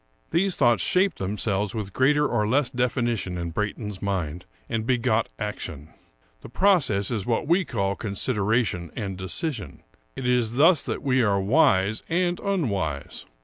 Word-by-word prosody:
These 180 +3 +1
thoughts 120 - +3
shaped 190 +2 +2
themselves 100 +1 -1
with 100 -3 -5
greater 150 +3 +3
or 105 -3 0
less 130 +3 +1
definition 120 -6 -1
in 85 -1 -4
Brayton's 105 +1 -4
mind, 90 -4 -3 0.2
and 115 -1 -2
begot 115 -2 +1
action. 80 -8 -6 0.5
The - - -11
process 135 - +2
is 105 -5 -2
what 120 +5 0
we 175 +4 +3
call 100 -7 -1
consideration 105 -3 -1
and 100 -5 -4
decision. 100 - -4 0.3
It 130 - -4
is 120 -2 +2
thus 155 +4 +5
that - - -4
we 130 -2 +2
are 100 -4 +2
wise 100 -2 +3
and 175 +1 0
unwise. 100 - -2
110 Hz, 145 wpm, -25 LUFS, 100-135 Hz, 0.5 s, thus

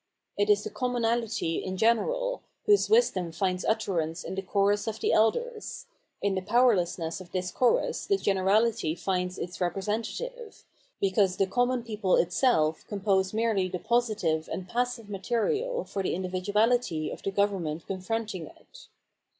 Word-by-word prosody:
It 205 +1 +1
is 205 0 +4
the - - -5
commonalty 235 -7 -1
in 185 0 -4
general, - - +1 0.2
whose 415 -1 +4
wisdom 200 - +3
finds 185 +2 -1
utterance 180 -7 -1
in - - -5
the 195 - -2
Chorus 200 +2 +1
of 220 0 -3
the - - +1
Elders; 435 - 0 0.4
in 200 -1 +2
the 190 - -1
powerlessness 185 -6 +2
of 175 -2 -13
this 180 -1 -2
chorus 255 - +1
the 395 - +3
generahty 195 - +1
finds 180 -1 -2
its 180 +2 -6
representative, 225 - -3 0.3
because 190 -1 +2
the 195 - +3
common 245 +4 0
people 210 -5 +1
itself 170 - +2
compose 195 -2 +1
merely 220 -4 +1
the 180 - -3
positive 215 -8 0
and 185 - -4
passive 245 +1 -2
material 415 - -1
for 195 - -4
the 190 - -1
individuahty 190 0 0
of - - -10
the - - -2
government 190 -6 -1
confronting 195 -2 -3
it. - - -16
205 Hz, 145 wpm, -28 LUFS, 185-235 Hz, 0.4 s, is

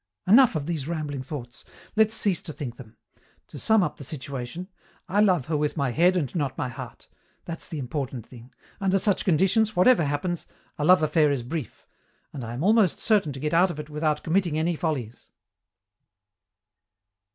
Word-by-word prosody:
Enough 235 +2 +6
of 150 -2 -2
these 155 -4 -3
rambling 150 -5 -3
thoughts. 130 -3 -8 0.3
Let's 220 0 +4
cease 200 -6 +1
to 155 - -6
think 125 -6 -6
them. 115 -4 -13 0.5
To - - -9
sum 220 -3 +4
up - - -3
the 145 - -9
situation: 140 +4 -6 0.4
I 195 +4 0
love 180 -10 +3
her 155 - -2
with 150 +2 -1
my 140 -3 0
head 175 +7 +3
and 140 -8 -2
not 140 -6 -2
my 130 - -2
heart. 120 - -10 0.4
That's 165 -1 -6
the 160 - -5
important 130 -3 -4
thing. 125 0 -14 0.3
Under 195 -1 +2
such 200 0 +1
conditions, 195 +5 +2
whatever 180 -1 +5
happens, 150 +5 -2 0.3
a - - 0
love 180 -1 +6
affair 155 0 +3
is 140 -4 -1
brief, 140 -2 -6 0.5
and 135 -4 -6
I 115 +1 -6
am 135 - -4
almost 210 -3 +4
certain 205 -9 +2
to 135 - -8
get 150 +3 -2
out 180 +3 +4
of 155 - -6
it 150 0 -8
without 150 0 -1
committing 170 -2 +1
any 165 +2 0
follies." 135 -9 -4
155 Hz, 185 wpm, -25 LUFS, 140-185 Hz, 0.5 s, Enough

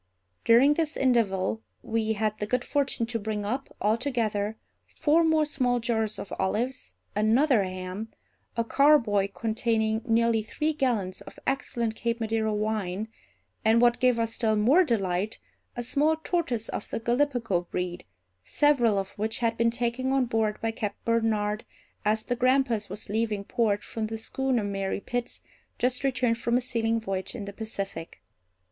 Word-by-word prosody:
During 250 +6 +6
this 315 0 -1
interval 220 -5 +1 0.2
we 220 -1 0
had 215 0 -1
the 210 - -2
good 250 +2 0
fortune 280 -5 0
to 230 0 -3
bring 210 -1 -3
up, 255 +6 -3
altogether, 220 -2 0 0.4
four 325 +2 +3
more 315 -1 +3
small 255 -4 0
jars 220 -3 0
of - - -7
olives, 245 +7 -2 0.2
another 225 +3 +4
ham, 185 +3 -5 0.5
a 230 - +2
carboy 230 -7 +4
containing 220 0 0
nearly 230 -1 +2
three 305 +8 -1
gallons 230 -10 -1
of - - -12
excellent 235 -4 -1
Cape 235 +1 -2
Madeira 220 -1 0
wine, 210 -1 -2 0.5
and, 220 +1 +5
what 240 0 +4
gave 250 -2 +3
us 230 0 -1
still 220 -2 +1
more 255 - +5
delight, 200 - 0 0.4
a 240 - -2
small 295 +6 +2
tortoise 320 -8 -1
of - - -5
the - - -3
Gallipago 235 -7 0
breed, 180 0 -3 0.4
several 245 - +3
of 195 -1 -2
which 220 +1 -1
had 230 -1 0
been 230 0 +3
taken 240 +2 -1
on 270 -2 +3
board 220 -3 0
by 225 - 0
Captain 210 -2 -4
Barnard, 220 -2 +1 0.4
as 215 +1 +1
the 245 - -1
Grampus 250 -4 +2
was 205 +3 -6
leaving 215 -1 -1
port, 205 -1 0
from 220 -1 -4
the 225 +1 -4
schooner 255 +1 -1
Mary 195 -1 -2
Pitts, 245 +3 -4 0.4
just 250 +2 0
returned 250 -3 +1
from 235 +1 +1
a - - 0
sealing 230 -2 0
voyage 195 -3 -4
in 205 - -5
the 200 - -7
Pacific. 200 -5 -6
225 Hz, 160 wpm, -27 LUFS, 210-250 Hz, 0.5 s, During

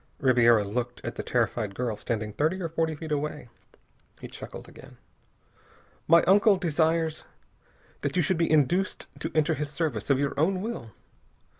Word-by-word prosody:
Ribiera 120 -5 +4
looked 120 +4 -3
at - - -3
the - - -5
terrified 105 -4 -1
girl 120 -2 -2
standing 105 0 -4
thirty 155 - 0
or 170 -3 -3
forty 160 -1 -1
feet 155 +1 -8
away. 150 -3 -3 0.7
He - - -8
chuckled - - -9
again. - - -15 1.1
"My 170 +1 +6
uncle 200 +1 +5
desires 160 -2 0 0.8
that - - -2
you 180 - +3
should 170 +2 0
be 165 - +2
induced 165 +6 +1
to - - -4
enter 155 -2 +3
his 150 +1 -3
service 145 - -3
of 140 - +4
your 140 0 -1
own 185 +5 +2
will. 220 - -5
150 Hz, 160 wpm, -27 LUFS, 120-170 Hz, 1.1 s, My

